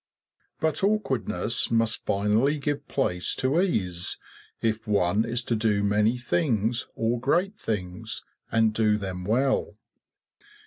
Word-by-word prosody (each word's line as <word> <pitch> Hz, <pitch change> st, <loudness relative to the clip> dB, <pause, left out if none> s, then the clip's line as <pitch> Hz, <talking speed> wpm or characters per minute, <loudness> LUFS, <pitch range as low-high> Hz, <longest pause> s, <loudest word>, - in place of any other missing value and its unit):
But 160 Hz, +2 st, 0 dB
awkwardness 130 Hz, -, 0 dB
must 115 Hz, -1 st, +1 dB
finally 105 Hz, +9 st, +2 dB
give 145 Hz, 0 st, -3 dB
place 90 Hz, -10 st, 0 dB
to 140 Hz, +7 st, +2 dB
ease 90 Hz, -, 0 dB, 0.4 s
if 110 Hz, 0 st, -1 dB
one 100 Hz, +1 st, +2 dB
is 120 Hz, +1 st, -1 dB
to 120 Hz, -, 0 dB
do 105 Hz, -2 st, +1 dB
many 105 Hz, +4 st, +2 dB
things 120 Hz, -, 0 dB
or 115 Hz, +1 st, 0 dB
great 180 Hz, -, 0 dB
things, 110 Hz, +3 st, -4 dB, 0.3 s
and 110 Hz, -1 st, +3 dB
do 110 Hz, -1 st, +2 dB
them 95 Hz, -3 st, -5 dB
well. 130 Hz, +6 st, +1 dB
115 Hz, 125 wpm, -26 LUFS, 105-135 Hz, 0.4 s, and